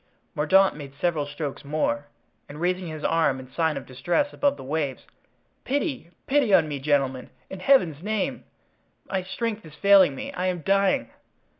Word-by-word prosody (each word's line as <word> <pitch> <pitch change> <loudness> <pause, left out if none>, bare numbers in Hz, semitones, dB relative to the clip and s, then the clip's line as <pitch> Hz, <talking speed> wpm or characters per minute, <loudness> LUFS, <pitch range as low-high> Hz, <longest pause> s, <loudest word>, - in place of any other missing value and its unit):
Mordaunt 190 +6 +4
made 140 -2 -9
several 160 -5 0
strokes 145 -1 -5
more, 145 0 -1 0.4
and 145 +1 -9
raising 180 +1 -1
his 155 -1 -7
arm 160 -5 +2
in 130 0 -12
sign 160 -2 0
of 135 - -6
distress 175 - -1
above 285 -1 +1
the - - -9
waves: 140 -1 -3 0.6
"Pity, 275 - -2 0.2
pity 270 -5 +2
on 160 - +4
me, 145 -2 -4
gentlemen, 135 -2 0 0.2
in 190 - -6
Heaven's 180 - +3
name! 210 +1 -2 0.6
my 190 - -1
strength 220 +3 -4
is 155 -2 -13
failing 190 -3 +5
me; - - -6
I 180 +1 -2
am 180 -2 -2
dying." 195 -10 +2
165 Hz, 165 wpm, -25 LUFS, 145-195 Hz, 0.6 s, failing